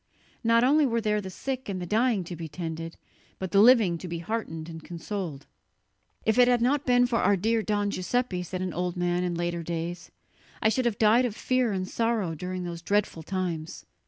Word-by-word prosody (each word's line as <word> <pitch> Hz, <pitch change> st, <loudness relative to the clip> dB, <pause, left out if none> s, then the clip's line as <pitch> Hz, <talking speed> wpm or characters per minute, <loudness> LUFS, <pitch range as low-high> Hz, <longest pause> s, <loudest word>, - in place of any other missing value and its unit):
Not 230 Hz, 0 st, +4 dB
only 290 Hz, +3 st, +4 dB
were 230 Hz, -1 st, +1 dB
there 210 Hz, -1 st, 0 dB
the 190 Hz, -, -7 dB
sick 260 Hz, +5 st, -5 dB
and 190 Hz, -2 st, -3 dB
the 180 Hz, -, -4 dB
dying 220 Hz, +1 st, +2 dB
to 175 Hz, +1 st, -7 dB
be 165 Hz, 0 st, -6 dB
tended, 165 Hz, 0 st, -6 dB, 0.4 s
but 190 Hz, -1 st, -5 dB
the 195 Hz, -, +4 dB
living 215 Hz, -8 st, +6 dB
to 180 Hz, -, -7 dB
be 170 Hz, 0 st, -4 dB
heartened 165 Hz, -4 st, -4 dB
and 165 Hz, -1 st, -9 dB
consoled. 170 Hz, -4 st, -5 dB, 0.8 s
"If 220 Hz, +2 st, +2 dB
it 245 Hz, -, +7 dB
had 245 Hz, -1 st, +4 dB
not 270 Hz, +4 st, +1 dB
been 245 Hz, 0 st, +5 dB
for 240 Hz, -1 st, 0 dB
our 205 Hz, -, +3 dB
dear 225 Hz, +4 st, +1 dB
Don 205 Hz, -1 st, 0 dB
Giuseppe," 190 Hz, 0 st, -1 dB
said 185 Hz, +1 st, -4 dB
an 185 Hz, -3 st, -3 dB
old 180 Hz, +1 st, -2 dB
man 175 Hz, 0 st, 0 dB
in 175 Hz, -1 st, -1 dB
later 170 Hz, 0 st, -2 dB
days, 170 Hz, +1 st, -4 dB, 0.5 s
"I 220 Hz, -, +3 dB
should 255 Hz, +3 st, 0 dB
have 230 Hz, -3 st, +1 dB
died 225 Hz, +3 st, +5 dB
of 225 Hz, -4 st, -3 dB
fear 255 Hz, -1 st, +1 dB
and 185 Hz, -1 st, -2 dB
sorrow 225 Hz, -7 st, 0 dB
during 180 Hz, +3 st, -4 dB
those 170 Hz, -1 st, -5 dB
dreadful 200 Hz, -2 st, 0 dB
times." 170 Hz, -2 st, -4 dB
190 Hz, 210 wpm, -27 LUFS, 175-230 Hz, 0.8 s, it